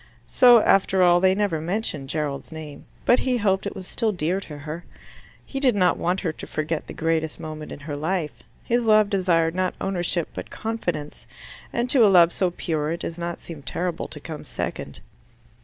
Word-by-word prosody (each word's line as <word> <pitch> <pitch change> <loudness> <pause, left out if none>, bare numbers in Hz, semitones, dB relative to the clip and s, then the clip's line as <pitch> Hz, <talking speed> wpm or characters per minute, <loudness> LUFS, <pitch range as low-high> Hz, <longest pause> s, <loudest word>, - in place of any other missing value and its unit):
So 245 -3 +6
after 190 -1 +4
all 175 0 +6
they 190 +1 +4
never 195 -6 0
mentioned 160 -6 -3
Gerald's 145 -1 -3
name. 155 -2 -9 0.2
But 245 - +5
he 255 -2 0
hoped 195 -3 +1
it - - -6
was 185 - -8
still 225 -2 0
dear 175 0 -1
to 150 -5 -9
her. 155 +4 -7 0.6
He 270 - -5
did 260 -5 +4
not 180 -3 +3
want 180 +2 -1
her 165 - -1
to - - -9
forget 155 0 -3
the - - -7
greatest 160 -1 -1
moment 155 -1 -7
in - - -8
her 145 0 -5
life. 160 +1 -2 0.2
His 240 -1 0
love 215 -1 +5
desired 170 -4 +2
not 185 0 -1
ownership 175 -3 -1
but - - -7
confidence, 175 -10 -4 0.4
and 235 +1 -1
to 255 -5 +6
a - - +7
love 175 -3 +6
so 185 - +1
pure 155 -3 -2
it 170 +1 -3
does 165 +1 -5
not 170 0 -4
seem 160 -4 -9
terrible 175 +4 -3
to 150 - -9
come 155 0 -7
second. - - -5
175 Hz, 195 wpm, -24 LUFS, 155-195 Hz, 0.6 s, a